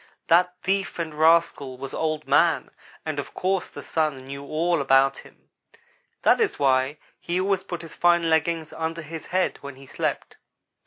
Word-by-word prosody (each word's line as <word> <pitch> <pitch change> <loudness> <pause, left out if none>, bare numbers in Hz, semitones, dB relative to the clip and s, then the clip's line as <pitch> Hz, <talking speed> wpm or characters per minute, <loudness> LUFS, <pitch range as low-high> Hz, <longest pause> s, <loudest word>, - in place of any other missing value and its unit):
That 180 +2 +4
thief 195 -1 -1
and 165 -2 -3
rascal 155 -4 +2
was 135 +1 -7
Old 155 -1 -2
man, - - +3 0.3
and - - -3
of - - -7
course 190 0 -1
the - - -10
Sun 150 -5 -1
knew 140 +1 -7
all 160 +3 0
about 135 0 +3
him. - - -18 0.7
That - - +4
is 430 -3 +1
why 135 +1 +2 0.2
he 175 +1 -2
always 190 0 0
put 175 -3 -6
his 165 - -10
fine 175 -1 +3
leggings 160 0 0
under 165 +1 -4
his 160 +1 -8
head 185 0 0
when 140 -1 -8
he 135 +1 -14
slept. - - -3
160 Hz, 170 wpm, -25 LUFS, 140-175 Hz, 0.7 s, That